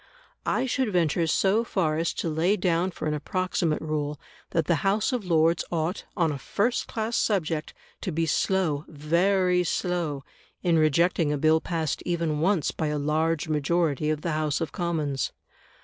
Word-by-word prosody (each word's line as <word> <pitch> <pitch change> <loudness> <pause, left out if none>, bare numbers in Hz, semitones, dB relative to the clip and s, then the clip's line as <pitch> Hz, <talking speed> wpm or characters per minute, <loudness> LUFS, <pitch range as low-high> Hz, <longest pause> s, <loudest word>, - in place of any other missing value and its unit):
I - - +1
should 260 -3 0
venture 170 -2 +1
so 195 +7 +2
far 170 -9 0
as 165 +1 0
to - - -3
lay 165 +6 +1
down 180 -1 +1
for 170 - -5
an 155 - 0
approximate 170 0 -1
rule, 150 -2 -2 0.3
that 165 -2 0
the 170 0 +2
House 210 +6 +1
of 240 -5 -2
Lords 165 -1 +3
ought, 170 +2 -2
on 165 -4 +2
a 140 - -4
first 235 - 0
class 225 +1 -2
subject, 165 -7 0 0.3
to 185 - -3
be 165 +1 0
slow 160 -2 +1
very 180 +4 +2
slow 170 -5 -1 0.4
in 170 -3 +3
rejecting 155 +1 +3
a 150 - 0
Bill 155 +2 +3
passed 160 -4 -2
even 165 -3 -1
once 175 0 +2
by 160 - -2
a 150 0 -1
large 155 +2 0
majority 155 -1 +1
of 155 -1 -1
the 170 - -2
House 155 -1 0
of 165 - -3
Commons. 155 -7 -2
165 Hz, 170 wpm, -26 LUFS, 155-180 Hz, 0.4 s, Lords